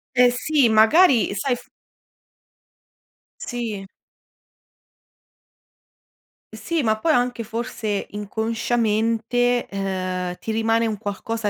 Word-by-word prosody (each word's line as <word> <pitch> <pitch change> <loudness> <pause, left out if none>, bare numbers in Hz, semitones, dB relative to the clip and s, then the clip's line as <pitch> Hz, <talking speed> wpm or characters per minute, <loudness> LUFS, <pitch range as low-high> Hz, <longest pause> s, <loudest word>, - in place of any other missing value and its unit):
Eh, 250 0 +6
sì, 285 -2 +2
magari 225 - +5
sai 245 +6 0
f - - -14 1.7
Sì. 225 -5 -4 2.7
Sì, 335 -3 -2
ma 220 -2 +1
poi 325 - +2
anche 245 -2 0
forse 220 -2 -3
inconsciamente, 225 +3 0
uhm, 185 -2 -3
ti 220 - -4
rimane 225 +1 +1
un 215 -2 -3
qualcosa 215 +1 -3
225 Hz, 90 wpm, -22 LUFS, 210-245 Hz, 2.7 s, Eh